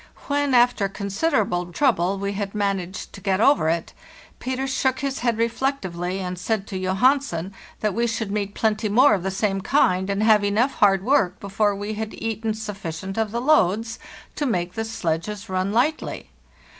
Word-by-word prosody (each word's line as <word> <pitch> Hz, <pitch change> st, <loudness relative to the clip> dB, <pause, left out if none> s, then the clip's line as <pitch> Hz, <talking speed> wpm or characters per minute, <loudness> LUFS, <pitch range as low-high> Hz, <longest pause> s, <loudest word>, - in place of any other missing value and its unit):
When, 285 Hz, -2 st, +1 dB
after 240 Hz, -5 st, +4 dB
consider 205 Hz, +8 st, 0 dB
able 175 Hz, -2 st, -3 dB
trouble, 195 Hz, -6 st, +1 dB
we 200 Hz, +1 st, -2 dB
had 200 Hz, 0 st, -4 dB
managed 195 Hz, -2 st, -2 dB
to 200 Hz, -, -10 dB
get 190 Hz, +1 st, 0 dB
over 225 Hz, -, +4 dB
it, 165 Hz, 0 st, -2 dB, 0.5 s
Peter 260 Hz, +1 st, -2 dB
shook 265 Hz, -1 st, 0 dB
his 275 Hz, -1 st, -2 dB
head 235 Hz, -2 st, 0 dB
reflectively, 225 Hz, -7 st, -1 dB
and 180 Hz, -1 st, -4 dB
said 200 Hz, +2 st, -1 dB
to 195 Hz, -, -6 dB
Johansen 190 Hz, -, +1 dB, 0.3 s
that 215 Hz, -2 st, 0 dB
we 235 Hz, +3 st, +1 dB
should 225 Hz, -2 st, -3 dB
meet 205 Hz, -1 st, -2 dB
plenty 215 Hz, -1 st, 0 dB
more 245 Hz, +4 st, +5 dB
of 195 Hz, -, 0 dB
the 190 Hz, -, -2 dB
same 195 Hz, 0 st, -1 dB
kind, 190 Hz, -5 st, +2 dB
and 200 Hz, +1 st, 0 dB
have 215 Hz, -2 st, +5 dB
enough 220 Hz, +7 st, +2 dB
hard 195 Hz, -2 st, +4 dB
work 230 Hz, -9 st, +2 dB
before 200 Hz, +1 st, 0 dB
we 205 Hz, +2 st, -4 dB
had 215 Hz, 0 st, -5 dB
eaten 225 Hz, -1 st, -2 dB
sufficient 195 Hz, -4 st, -6 dB
of 220 Hz, -1 st, 0 dB
the 235 Hz, +3 st, -2 dB
loads 225 Hz, -, +2 dB, 0.4 s
to 295 Hz, -, 0 dB
make 180 Hz, -6 st, -1 dB
the 225 Hz, +2 st, -3 dB
sledges 205 Hz, -1 st, -3 dB
run 185 Hz, +1 st, -1 dB
lightly. 265 Hz, +8 st, -1 dB
210 Hz, 180 wpm, -23 LUFS, 190-235 Hz, 0.5 s, more